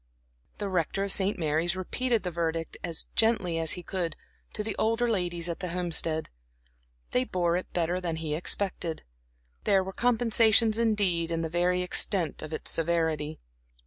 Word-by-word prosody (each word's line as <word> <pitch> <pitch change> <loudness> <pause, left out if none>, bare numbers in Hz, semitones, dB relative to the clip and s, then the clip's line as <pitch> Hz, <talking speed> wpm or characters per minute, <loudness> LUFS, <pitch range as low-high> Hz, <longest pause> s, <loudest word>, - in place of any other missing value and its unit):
The 205 - -3
Rector 185 +1 -1
of 200 - 0
St. 195 +1 +2
Mary's 160 +2 0
repeated 230 +5 -1
the 180 - -3
verdict, 165 -1 -2
as 170 -2 -1
gently 205 -7 +2
as 160 -1 +4
he 180 - -7
could, 170 -3 -3 0.4
to 210 - -3
the 215 -1 -3
older 230 +2 +1
ladies 175 -6 -1
at 170 - -4
the 180 - -3
Homestead. 165 -2 +1 0.8
They 125 - +2
bore 175 +2 0
it 180 - -4
better 175 +1 -1
than 170 -2 -2
he 160 -2 -4
expected. 175 0 -2 0.6
There 195 -1 +3
were 190 +1 -7
compensations 230 -2 +4
indeed 200 -7 +1
in 165 -1 -1
the 165 - -2
very 180 +2 +1
extent 180 -2 +2
of 155 - -7
its 155 - -2
severity. 160 -2 0
175 Hz, 165 wpm, -28 LUFS, 165-200 Hz, 0.8 s, as